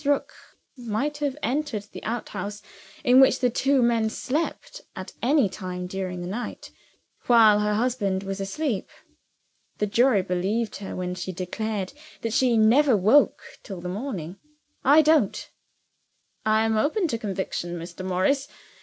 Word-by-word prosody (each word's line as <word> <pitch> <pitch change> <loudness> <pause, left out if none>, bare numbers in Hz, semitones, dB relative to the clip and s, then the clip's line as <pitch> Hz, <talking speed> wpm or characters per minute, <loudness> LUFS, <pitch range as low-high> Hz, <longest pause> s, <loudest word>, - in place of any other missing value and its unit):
Rook 285 0 0 0.4
might 250 +4 -3
have 290 -2 -2
entered 255 -4 -1
the 205 - -11
outhouse 210 -3 -5 0.4
in 255 -1 +6
which 265 -1 +5
the 250 -1 +2
two 270 +1 +2
men 230 -2 +2
slept, 320 - -3
at - - -8
any 275 -2 +3
time 185 -1 -6
during 185 -1 -4
the 175 - -5
night, 225 +6 -6 0.6
while 220 -4 +6
her 210 0 +1
husband 210 -5 0
was 195 0 -4
asleep. 225 +2 -2 0.9
The 210 - 0
jury 220 -1 +3
believed 195 +5 -1
her 195 0 -7
when 180 0 -3
she 185 +1 -5
declared 190 +3 -4 0.3
that 230 -1 -2
she 245 -1 +3
never 235 +3 +5
woke 220 +10 +4 0.2
till 195 -4 -8
the 180 +1 -5
morning. 195 - -5 0.5
I 295 +4 +6
don't." 305 -9 +2 0.9
"I 220 +1 +3
am 220 -1 +1
open 320 - +1
to 230 - -2
conviction, 190 -4 -3
Mr. 170 +2 -8
Morris. 190 +10 +1
220 Hz, 145 wpm, -25 LUFS, 190-260 Hz, 0.9 s, in